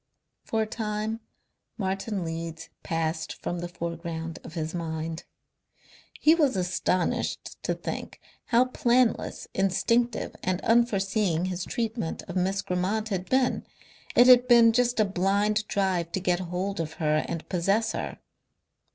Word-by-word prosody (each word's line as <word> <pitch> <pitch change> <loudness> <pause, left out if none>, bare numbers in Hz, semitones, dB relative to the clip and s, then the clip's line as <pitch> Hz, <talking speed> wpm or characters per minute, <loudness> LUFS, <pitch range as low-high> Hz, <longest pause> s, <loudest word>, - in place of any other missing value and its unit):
For 220 -1 0
a - - -2
time 215 0 -3 0.6
Martin 195 -1 -2
Leeds 165 0 -5
passed 160 -1 -2
from 175 - -2
the 175 - -4
foreground 165 -1 -5
of 165 - -10
his 160 -1 -3
mind. 160 -1 -4 0.9
He 310 - +6
was 300 -7 +2
astonished 180 -1 -1
to - - -1
think - - -6 0.3
how 245 +1 +4
planless, 245 -2 +1
instinctive 230 +6 +1
and 185 -1 0
unforeseeing 200 -6 +2
his 185 -1 -3
treatment 225 -6 -3
of 175 - -8
Miss 190 +2 0
Grammont 195 +5 -1
had 185 -2 -3
been. 260 -1 +2 0.5
It 245 - +8
had 250 0 +7
been 235 -2 +7
just 245 0 +2
a 215 - +5
blind 200 +3 +1
drive 185 -4 0
to - - 0
get 180 -1 +1
hold 185 +2 -3
of 160 -1 -3
her 155 -2 +1
and 165 -1 -5
possess 195 +5 +1
her.... - - -4
190 Hz, 140 wpm, -27 LUFS, 170-225 Hz, 0.9 s, It